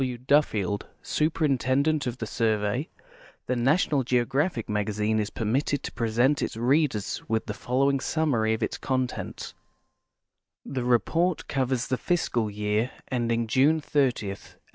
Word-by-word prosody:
W. 125 -2 -1
Duffield, 115 -7 +1 0.2
Sui)erintendent 145 -2 +1
of 120 0 -3
the 115 - -4
Survey, 110 +4 0 0.6
The 125 - -1
National 135 +3 +2
Geogiiaimiic 125 - 0
^Magazine 105 +1 0
is 105 - -1
permitted 130 +6 -1
to - - -4
present 120 +5 +1
its - - -3
readers 125 -3 +1
with 110 0 0
the 105 - -4
following 135 +5 +1
summary 130 -7 +1
of - - -4
its - - -2
contents: 130 -2 -3 1.1
Tlie 125 -2 -2
report 165 - +1
covers 130 -2 0
the 130 - +1
fiscal 125 -11 0
year 105 +3 -1 0.2
ending 115 -2 0
June 135 +7 +3
30, 135 -8 0
1895. 100 - -10
125 Hz, 135 wpm, -26 LUFS, 110-140 Hz, 1.1 s, June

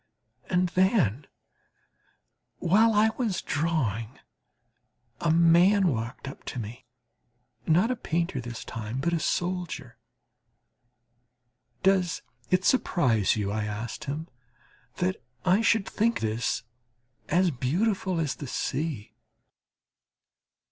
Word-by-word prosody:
And 180 -1 +2
then, 175 - +2 1.3
while 215 +6 +4
I 215 +1 +5
was 220 -7 0
drawing, 130 - -1 1.0
a 170 - 0
man 170 +4 +5
walked 115 0 -4
up 135 - -9
to - - -5
me 120 +3 -8 0.8
not 180 +9 +4
a - - 0
painter 170 - -2
this 120 -1 -7
time, 115 +2 -5
but 170 +5 0
a 170 - +1
soldier. 175 -7 -2 1.8
"Does 190 -2 +2 0.3
it 185 0 +2
surprise 125 - +3
you," 100 -2 -1
I 105 0 -1
asked 110 +7 -5
him, 150 +3 -4 0.7
"that 185 +1 -1 0.2
I 185 +4 +4
should 225 -2 +3
think 230 +2 +1
this 110 +2 -1 0.7
as 180 +2 +3
beautiful 185 - 0
as 150 -5 -1
the 145 - -6
sea?" 145 -3 -3
165 Hz, 105 wpm, -27 LUFS, 120-185 Hz, 1.8 s, I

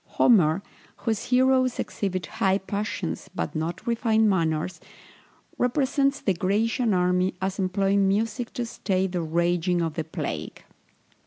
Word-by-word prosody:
Homer, 185 -5 +4 0.3
whose 220 -3 -2
heroes 255 0 +3
exhibit 185 -3 -3
high 195 -3 +1
passions, 200 -2 -4
but - - -3
not 165 +3 -3
refined 225 -2 +2
manners, 165 -2 0 0.8
represents 275 +2 +1
the 195 - +1
Grecian 215 +6 +1
army 180 +1 +1
as 190 +1 -3
employing 195 +1 +2
music 225 +4 -1
to 245 - -2
stay 190 -4 -1
the 180 -2 -2
raging 170 +2 +1
of 165 -2 -1
the 160 - -2
plague. 145 - -5
195 Hz, 130 wpm, -25 LUFS, 175-225 Hz, 0.8 s, Homer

